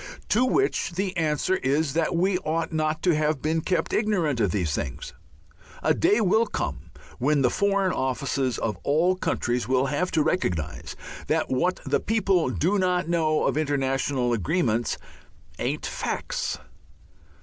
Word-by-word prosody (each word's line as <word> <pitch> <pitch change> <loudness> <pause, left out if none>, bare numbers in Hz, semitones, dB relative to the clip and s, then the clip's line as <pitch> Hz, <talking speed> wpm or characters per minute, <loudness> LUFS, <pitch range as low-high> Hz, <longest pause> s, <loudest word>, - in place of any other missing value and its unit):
To 235 - +3
which 320 - +1
the 190 +1 -2
answer 165 +3 +1
is 140 +1 0
that 165 +1 0
we 180 +2 +2
ought 165 0 -2
not 155 0 -1
to 180 - +4
have 150 -1 +1
been 160 +3 0
kept 180 - -1
ignorant 175 - +1
of 105 -4 +2
these 85 -5 -1
things. 60 - -4 0.7
A - - +4
day 210 - +3
will 220 +2 +3
come - - -4 0.3
when 140 +2 +2
the 125 - +3
Foreign 200 -2 +1
Offices 130 -1 -1
of 105 -5 -2
all 165 +6 +2
countries 120 - -1
will 130 +1 +2
have 150 +6 -1
to 155 - +3
recognize 90 - -2 0.3
that - - 0
what 175 +8 0
the - - +1
people 195 - +1
do 185 +10 +1
not 180 -2 +1
know 160 -2 +2
of - - +1
international 135 -4 0
agreements 120 - 0 0.6
"ain't - - -2
facts." - - -3
155 Hz, 150 wpm, -25 LUFS, 130-185 Hz, 0.7 s, to